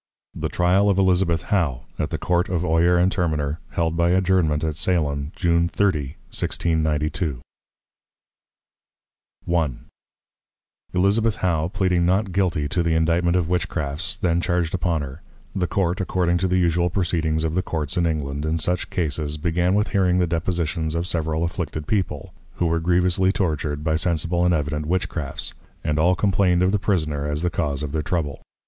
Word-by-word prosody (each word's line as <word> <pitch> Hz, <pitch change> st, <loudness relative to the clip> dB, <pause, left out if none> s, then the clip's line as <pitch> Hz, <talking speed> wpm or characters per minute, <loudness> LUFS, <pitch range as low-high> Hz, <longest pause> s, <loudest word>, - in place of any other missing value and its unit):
THE -, -, -3 dB
TRYAL 95 Hz, +3 st, +3 dB
OF 100 Hz, -, +2 dB
ELIZABETH 90 Hz, -3 st, +2 dB
HOW, 70 Hz, -11 st, +1 dB, 0.2 s
AT -, -, -1 dB
THE -, -, -2 dB
COURT 90 Hz, +1 st, 0 dB
OF 90 Hz, -1 st, -1 dB
OYER 85 Hz, +2 st, +3 dB
AND 90 Hz, +2 st, +3 dB
TERMINER, 75 Hz, -5 st, -1 dB
HELD 80 Hz, -1 st, -1 dB
BY 85 Hz, +1 st, +2 dB
ADJOURNMENT 90 Hz, -4 st, +2 dB
AT 80 Hz, -1 st, -1 dB
SALEM, 75 Hz, -4 st, 0 dB
JUNE 85 Hz, -1 st, +2 dB
30. 80 Hz, -9 st, 0 dB, 0.2 s
1692. 80 Hz, -2 st, 0 dB, 2.2 s
I. 80 Hz, -4 st, +2 dB, 1.3 s
Elizabeth 105 Hz, +4 st, +2 dB
How 85 Hz, -3 st, 0 dB
pleading 90 Hz, -2 st, +1 dB
Not 95 Hz, +2 st, +1 dB
Guilty 85 Hz, -6 st, 0 dB
to 90 Hz, -3 st, 0 dB
the 85 Hz, -1 st, +1 dB
Indictment 85 Hz, +2 st, +2 dB
of 85 Hz, -3 st, 0 dB
Witchcrafts, 85 Hz, +1 st, -1 dB
then 85 Hz, -2 st, +1 dB
charged 85 Hz, -1 st, 0 dB
upon 85 Hz, -4 st, 0 dB
her; 70 Hz, +3 st, -8 dB, 0.3 s
the 90 Hz, -2 st, 0 dB
Court, 90 Hz, +1 st, 0 dB
according 90 Hz, -1 st, +1 dB
to 95 Hz, -, +1 dB
the 90 Hz, 0 st, +1 dB
usual 85 Hz, 0 st, +2 dB
Proceedings 80 Hz, -4 st, 0 dB
of 80 Hz, -1 st, -1 dB
the 90 Hz, -, +1 dB
Courts 75 Hz, -5 st, -3 dB
in 85 Hz, -1 st, +2 dB
England, 75 Hz, -2 st, -2 dB
in 80 Hz, +1 st, 0 dB
such 90 Hz, +3 st, -1 dB
Cases, 75 Hz, -3 st, -2 dB
began 85 Hz, +4 st, +1 dB
with 105 Hz, +1 st, +1 dB
hearing 90 Hz, -3 st, +2 dB
the 90 Hz, -, +3 dB
Depositions 85 Hz, -1 st, -1 dB
of 85 Hz, +1 st, -1 dB
several 80 Hz, -2 st, -1 dB
afflicted 85 Hz, -3 st, -3 dB
People, 85 Hz, -8 st, -2 dB, 0.2 s
who 85 Hz, -, 0 dB
were 85 Hz, 0 st, +1 dB
grievously 90 Hz, +2 st, +2 dB
tortured 75 Hz, -6 st, -2 dB
by 80 Hz, 0 st, +1 dB
sensible 85 Hz, +1 st, 0 dB
and 90 Hz, -, +3 dB
evident 75 Hz, 0 st, -2 dB
Witchcrafts, 85 Hz, -4 st, -2 dB, 0.3 s
and 75 Hz, 0 st, 0 dB
all 90 Hz, +3 st, +4 dB
complained 95 Hz, -3 st, +2 dB
of 95 Hz, -, +3 dB
the 105 Hz, -, +1 dB
Prisoner, 75 Hz, -8 st, -1 dB
as 75 Hz, +2 st, -2 dB
the 90 Hz, -, +1 dB
cause 75 Hz, -3 st, -2 dB
of 75 Hz, -, -4 dB
their 80 Hz, +1 st, -1 dB
Trouble. 75 Hz, -3 st, -2 dB
85 Hz, 165 wpm, -23 LUFS, 80-90 Hz, 2.2 s, all